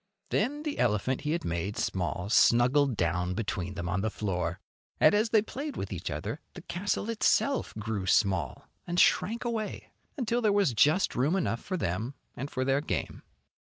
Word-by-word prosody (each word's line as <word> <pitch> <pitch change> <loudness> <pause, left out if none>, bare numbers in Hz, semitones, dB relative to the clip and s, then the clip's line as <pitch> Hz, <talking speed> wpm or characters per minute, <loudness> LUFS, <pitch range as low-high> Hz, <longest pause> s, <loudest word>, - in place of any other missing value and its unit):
Then 290 +3 0
the 300 -2 -3
elephant 120 +2 +1
he 150 - -2
had 170 - -2
made 85 +5 -2
small 90 0 -2
snuggled 120 +3 +4
down 90 +2 0
between 95 -4 -3
them 85 -2 -4
on 95 +2 0
the 110 - 0
floor. 90 -5 -2 0.4
And - - +6
as 215 +2 +2
they 220 -2 +4
played 285 +6 -6
with - - -4
each - - -4
other, - - -4
the - - -9
castle 200 +3 -2
itself 230 +4 +1
grew 105 -3 -3
small, 95 -4 +1 0.2
and 175 0 0
shrank 230 +5 +3
away 225 -3 -3 0.3
imtil 240 -1 0
there 215 -3 +3
was 200 -10 +3
just 150 - +3
room 145 +8 +1
enough 115 -11 -1
for 185 - -3
them 115 - -2 0.2
and 140 +3 -5
for 130 -2 -2
their 135 +1 +2
game. - - -3
130 Hz, 180 wpm, -29 LUFS, -, 0.4 s, And